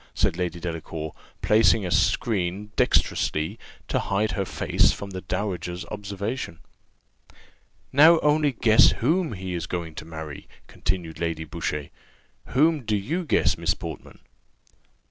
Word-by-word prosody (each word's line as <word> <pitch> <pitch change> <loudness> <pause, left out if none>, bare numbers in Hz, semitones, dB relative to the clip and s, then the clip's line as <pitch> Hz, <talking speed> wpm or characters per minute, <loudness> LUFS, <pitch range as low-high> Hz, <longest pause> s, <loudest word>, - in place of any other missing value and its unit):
said - - +1
Lady 90 -1 -3
Delacour, 80 -2 -5 0.3
placing 110 -1 +4
a 90 - -3
skreen, 100 +1 0
dexterously, 75 +1 +1 0.3
to - - 0
hide 105 +2 0
her 100 - -1
face - - +2
from 100 -1 -6
the 95 -1 -5
dowager's 90 -3 -3
observation. 105 -1 -4 1.4
"Now 160 +4 +7
only 150 0 +3
guess 110 -3 +5
whom 160 +3 +1
he 95 -1 -5
is 85 -2 -3
going 85 -2 -4
to 80 - -8
marry," 80 -2 -8 0.2
continued 90 -3 -3
Lady 80 -1 -2
Boucher: 75 -1 -4 0.6
"whom 155 +1 +2
do 110 -2 0
you 160 - -2
guess, - - +2
Miss - - +1
Portman?" - - -8
95 Hz, 130 wpm, -25 LUFS, 85-115 Hz, 1.4 s, Now